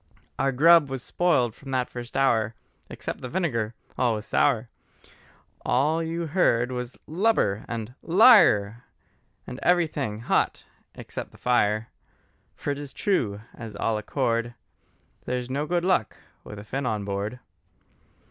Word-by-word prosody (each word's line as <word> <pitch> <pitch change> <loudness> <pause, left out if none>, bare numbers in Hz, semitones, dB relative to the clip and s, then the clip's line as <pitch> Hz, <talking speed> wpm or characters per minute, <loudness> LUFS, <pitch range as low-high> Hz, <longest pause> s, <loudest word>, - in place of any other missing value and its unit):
Our 135 - +2
grub 160 +2 +6
was 135 -2 -5
spoiled 135 -11 +1
from 135 - -13
that 130 -1 0
first 120 0 -7
hour, 115 -5 +2 0.3
Except - - -6
the 125 - -6
vinegar 120 - -1 0.2
all 120 -3 +2
was 105 0 -6
sour; 125 -4 +2 1.0
All 155 +6 +2
you 165 +1 -3
heard 130 -7 +2
was 125 0 -5
Lubber! 160 - +1
and 115 0 -5
Liar! 165 - +5 0.6
And 125 - -8
everything 150 -11 +1
hot 115 - 0 0.3
except - - -7
the - - -18
fire: 115 -2 +1 0.7
For 145 - -3
it 140 - -4
is 145 -2 -8
true, 115 - 0
as 115 -3 -9
all 110 +2 0
accord, 120 +1 -1 0.7
There's 125 0 -3
no 145 +3 -1
good 175 +1 0
luck 180 - +1 0.3
with 105 - -9
a 105 - -8
Finn 135 +5 -3
on 105 -3 -2
board. 100 +4 -3
125 Hz, 140 wpm, -25 LUFS, 110-155 Hz, 1.0 s, grub